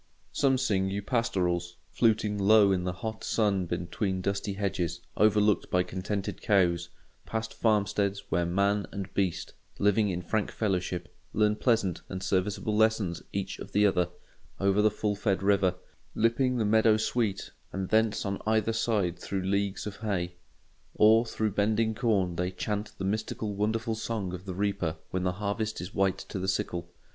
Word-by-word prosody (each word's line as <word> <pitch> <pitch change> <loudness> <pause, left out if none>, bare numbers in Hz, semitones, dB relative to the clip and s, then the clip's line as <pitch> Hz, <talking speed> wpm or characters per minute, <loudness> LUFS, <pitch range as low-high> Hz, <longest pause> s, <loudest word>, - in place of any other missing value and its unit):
Some 135 -2 +2
sing 95 -7 +1
you 100 +1 -3
pastorals, 90 -7 0 0.2
fluting 110 -3 +2
low 100 0 +6
in 90 -2 0
the 90 - 0
hot 110 0 -4
sun 100 -5 +1
between 95 +3 -2
dusty 100 +2 -2
hedges 90 -4 -2 0.2
overlooked 105 -1 +3
by 90 0 +2
contented 95 +2 -4
cows; 85 -4 +2 0.4
past 110 0 -3
farmsteads 100 -2 +1
where 85 +1 +1
man 100 +3 +1
and 100 -1 -6
beast, 90 -5 -1 0.2
living 105 +1 +3
in 90 -1 -3
frank 105 +4 -1
fellowship, 90 -4 -2 0.2
learn 105 -1 +3
pleasant 110 -7 +1
and 95 0 -5
serviceable 95 +3 0
lessons 110 -5 +2
each 100 -1 -3
of - - -9
the 105 0 +4
other; 90 -3 +2 0.5
over 100 +1 +3
the 110 - +5
full 105 0 -1
fed 100 -2 0
river, 95 -2 +3 0.4
lipping 125 +3 +2
the 110 - +1
meadow 110 +1 +4
sweet, 110 -2 -1 0.2
and 95 -1 -3
thence 110 -1 +2
on 100 0 -3
either 110 0 +2
side 105 -6 0
through 95 -2 -3
leagues 100 +1 -1
of 105 -2 -6
hay. 95 -5 -2 0.6
Or 110 +2 +5
through 110 -1 -1
bending 110 +3 +1
corn 100 -7 +1
they 90 +1 0
chant 105 +3 -3
the 95 - -3
mystical 105 +1 -2
wonderful 110 +3 -1
song 110 -4 -3
of 90 +1 -7
the 95 - -4
reaper 100 -4 -1 0.2
when 90 - -1
the 90 0 0
harvest 105 +3 -2
is 90 +3 -7
white 95 -1 +2
to 100 - -4
the 95 - -3
sickle. 85 -2 -2
100 Hz, 165 wpm, -29 LUFS, 95-110 Hz, 0.6 s, low